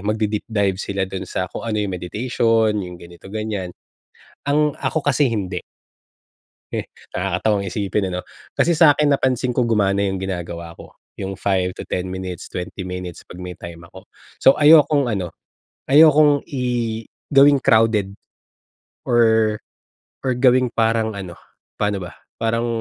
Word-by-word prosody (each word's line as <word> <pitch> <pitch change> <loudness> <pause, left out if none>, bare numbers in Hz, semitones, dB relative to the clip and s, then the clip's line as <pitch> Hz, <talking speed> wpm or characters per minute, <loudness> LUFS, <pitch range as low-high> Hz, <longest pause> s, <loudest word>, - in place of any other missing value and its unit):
mag-de-deep 105 0 -1
dive 100 -3 0
sila 100 -1 -2
dun 95 0 -6
sa 90 - -2
kung 115 - -5
ano, 110 - -1
yung 95 - -4
meditation, 110 +4 +1
yung 90 -2 -7
ganito 85 +2 -13
ganyan. 105 -4 -4 0.7
Ang 150 0 +1
ako 160 -3 -3
kasi 145 -2 +3
hindi. 95 -5 -3 1.1
Eh, - - -3 0.2
nakakatawang 100 +2 -1
isipin, 100 0 -1
ano? 90 0 -4 0.3
Kasi 170 - +3
sa’kin 150 -3 +5
napansin 130 -2 +1
ko 120 -1 +1
gumana 100 -3 +2
’yong 95 - -2
ginagawa 85 -3 -5
ko, - - -13 0.2
’yong 95 0 -4
5 90 -2 -1
to - - -7
10 90 0 -3
minutes, 90 -1 -6
20 90 +1 -6
minutes 90 -2 -7
'pag 90 +1 -10
may 90 - -6
time 85 0 -9
ako. 95 - -14 0.3
So 135 - +6
ayokong 145 -4 +5
ano, 90 -5 -3 0.5
ayokong 150 0 +6
i 120 -4 -2 0.2
gawing 140 0 +6
crowded 110 -3 +3 1.0
or 110 -2 +3 0.7
or 130 - 0
gawing 125 -1 +4
parang 115 -1 +1
ano, 90 -3 -7 0.4
paano 105 -1 -1
ba? - - -11 0.2
Parang, 115 +1 0
105 Hz, 140 wpm, -21 LUFS, 95-125 Hz, 1.1 s, So